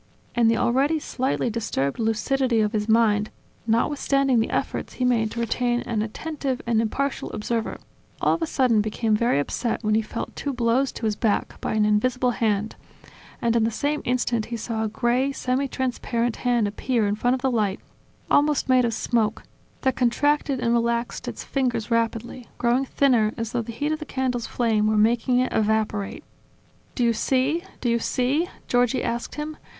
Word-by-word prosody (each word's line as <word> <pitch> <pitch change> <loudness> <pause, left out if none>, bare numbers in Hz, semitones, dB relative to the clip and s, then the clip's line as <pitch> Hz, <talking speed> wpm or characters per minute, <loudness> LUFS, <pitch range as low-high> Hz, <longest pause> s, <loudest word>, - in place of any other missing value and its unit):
And 235 -1 +4
the 230 - +2
already 275 +6 +2
slightly 260 -4 -1
disturbed 205 - -2
lucidity 230 +2 +1
of 210 -1 +2
his 215 -1 -2
mind, 215 -2 +3 0.4
notwithstanding 275 +2 +2
the 225 - 0
efforts - - -2
he 255 - -1
made 230 -3 +2
to 235 - -6
remain 240 +1 0
an 225 -3 -2
attentive 270 +4 -3
and 230 -1 +2
impartial 275 +5 -2
observer, 225 +1 -2 0.4
all - - +3
of 335 - -2
a 325 - 0
sudden 250 -7 +3
became 215 +1 0
very 235 - +2
upset 230 - -2
when 215 0 +1
he 220 - +3
felt 220 +1 -6
two 280 - -3
blows 245 +2 +1
to 230 - -5
his 215 -1 +1
back 215 -1 -1
by - - -2
an 215 -1 +3
invisible 250 +4 +2
hand, 215 -2 0 0.7
and 235 -1 +2
in 230 - +3
the 225 - +2
same 290 +6 -1
instant 240 -2 0
he 235 - -4
saw 225 0 -3
a - - 0
gray, 240 +5 +1
semi 265 +1 -1
transparent 240 -3 -2
hand 240 -4 +1
appear 225 +2 0
in 205 - +1
front 245 +4 +1
of 260 - -7
the 265 - +2
light, 210 -4 0 0.5
almost 295 0 +3
made 255 -1 +4
of 230 -1 -1
smoke, 225 -1 0 0.4
that 265 -2 +1
contracted 275 +2 +1
and 235 -1 +1
relaxed 235 0 -1
its - - -5
fingers 245 -5 -1
rapidly, 230 +1 -1
growing 245 +3 +2
thinner 240 -6 +2
as 230 -1 -3
though 240 - 0
the 230 - -6
heat 290 +7 -2
of 310 - -1
the 305 - -6
candle's 255 -4 -2
flame 220 -3 +1
were 215 0 +2
making 235 +3 +3
it 255 0 +1
evaporate. 215 -2 0 0.7
"Do 250 - 0
you 235 -1 +3
see? 270 +8 +1 0.2
Do - - -1
you 235 0 +2
see?" 265 +9 0 0.2
Giorgi 245 +1 +2
asked 235 0 -3
him. 300 +1 -5
235 Hz, 185 wpm, -24 LUFS, 220-260 Hz, 0.7 s, And